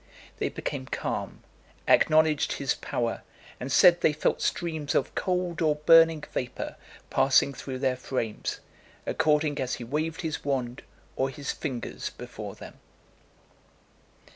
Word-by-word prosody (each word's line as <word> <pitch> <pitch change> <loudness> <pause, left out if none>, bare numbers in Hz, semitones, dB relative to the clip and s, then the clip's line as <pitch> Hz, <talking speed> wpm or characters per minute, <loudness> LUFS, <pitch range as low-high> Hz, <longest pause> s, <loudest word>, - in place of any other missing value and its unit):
They - - -1
became 65 - -5
calm, - - -4 0.4
acknowledged 155 -1 +4
his 140 - 0
power, 115 -1 -3 0.4
and 130 +2 -5
said 175 -2 +6
they 155 - +4
felt 150 - 0
streams 160 -4 -1
of - - +1
cold 180 -3 -1
or 155 -2 +3
burning 165 +1 +6
vapour 125 -1 -4 0.4
passing 140 +1 +4
through 130 -1 -6
their 130 -1 0
frames, 115 -4 -3 0.4
according 150 -2 +1
as 130 -1 -1
he - - -7
waved 155 +7 -2
his 160 -3 -3
wand 130 -3 -2 0.3
or 135 +1 0
his 140 +1 -4
fingers 130 -6 -4
before - - -8
them. - - -12
145 Hz, 130 wpm, -27 LUFS, 130-160 Hz, 0.4 s, said